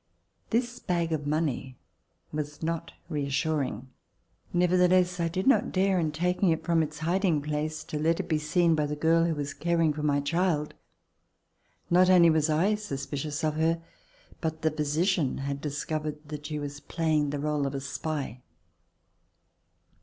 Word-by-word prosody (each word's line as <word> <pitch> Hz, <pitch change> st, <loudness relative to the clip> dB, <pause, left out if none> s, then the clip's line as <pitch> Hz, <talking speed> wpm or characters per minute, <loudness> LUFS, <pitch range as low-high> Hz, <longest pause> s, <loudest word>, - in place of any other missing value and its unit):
This 240 Hz, +1 st, 0 dB
bag 170 Hz, -2 st, -1 dB
of 145 Hz, -2 st, -2 dB
money 145 Hz, -4 st, -1 dB, 0.5 s
was 150 Hz, 0 st, -5 dB
not 165 Hz, 0 st, -3 dB
re 150 Hz, -4 st, -2 dB
assuring. 140 Hz, -4 st, -1 dB, 0.6 s
Nevertheless, 180 Hz, 0 st, +3 dB
I 170 Hz, -, +1 dB
did 185 Hz, +3 st, -2 dB
not 270 Hz, -, +4 dB
dare. 190 Hz, 0 st, +2 dB
In 160 Hz, -2 st, 0 dB
taking 180 Hz, +4 st, +1 dB
it 160 Hz, -1 st, 0 dB
from 165 Hz, -1 st, +2 dB
Its 155 Hz, -1 st, -3 dB
hiding 170 Hz, +1 st, +1 dB
place, 155 Hz, +1 st, -3 dB
to 150 Hz, -, -4 dB
let 165 Hz, +2 st, +2 dB
It -, -, -3 dB
be 155 Hz, -3 st, +1 dB
seen 165 Hz, +2 st, +2 dB
by 150 Hz, -2 st, +1 dB
the 150 Hz, -, -3 dB
girl 165 Hz, +2 st, +3 dB
who 165 Hz, -2 st, 0 dB
was 145 Hz, -1 st, -3 dB
caring 165 Hz, -1 st, +1 dB
for 150 Hz, -, -5 dB
my 145 Hz, -1 st, +2 dB
child. 155 Hz, 0 st, 0 dB, 1.2 s
Not 180 Hz, +1 st, +5 dB
only 175 Hz, -3 st, +7 dB
was 155 Hz, 0 st, +2 dB
I 170 Hz, +7 st, +3 dB
suspicious 145 Hz, -6 st, -4 dB
of 155 Hz, -1 st, +1 dB
her, 165 Hz, +1 st, +2 dB, 0.6 s
but 160 Hz, -1 st, -3 dB
the 160 Hz, -, +3 dB
physician 155 Hz, +1 st, 0 dB
had 140 Hz, 0 st, -3 dB
discovered 150 Hz, +1 st, -4 dB
that 150 Hz, -1 st, -6 dB
she 150 Hz, -1 st, -3 dB
was 145 Hz, 0 st, -5 dB
playing 155 Hz, -2 st, 0 dB
the 145 Hz, -, -2 dB
role 145 Hz, -1 st, 0 dB
of 140 Hz, -, -4 dB
a -, -, -1 dB
spy. 140 Hz, -2 st, -4 dB
155 Hz, 165 wpm, -28 LUFS, 150-170 Hz, 1.2 s, only